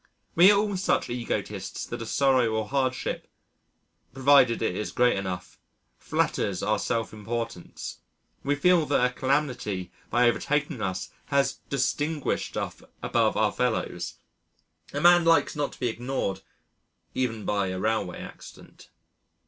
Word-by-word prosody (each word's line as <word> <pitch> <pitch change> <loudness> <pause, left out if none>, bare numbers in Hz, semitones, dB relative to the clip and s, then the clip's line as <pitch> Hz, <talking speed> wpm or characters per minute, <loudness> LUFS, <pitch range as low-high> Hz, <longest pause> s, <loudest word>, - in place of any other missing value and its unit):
We 175 +4 +8
are 205 - +6
all 205 -1 0
such 185 - 0
egotists 105 -5 -3
that 120 0 -6
a 115 - -5
sorrow 130 -3 +3
or 110 -1 -1
hardship 130 -2 -1 0.9
provided 135 -3 +5
it 90 - 0
is 105 - -3
great 125 0 +3
enough 95 -2 -5 0.4
flatters - - -1
our - - +1
self 115 -1 -1
importance. 115 -3 -5 0.4
We 145 +1 +1
feel 165 +1 +3
that 130 -3 +3
a 125 - 0
calamity 125 - -1 0.2
by 120 +1 +4
overtaking 145 +1 0
us 95 -3 -3 0.2
has 140 -1 +1
distinguished 145 +3 -1
us - - -4 0.2
above - - +2
our - - +3
fellows. - - -2 0.8
A 145 - -2
man 175 0 +7
likes 165 -3 +3
not 145 -1 -2
to - - -15
be 125 - 0
ignored 120 -3 -3 0.7
even 115 -4 -2
by 100 -2 0
a 95 0 -3
railway 110 -2 -1
accident. - - -12
125 Hz, 140 wpm, -27 LUFS, 110-145 Hz, 0.9 s, We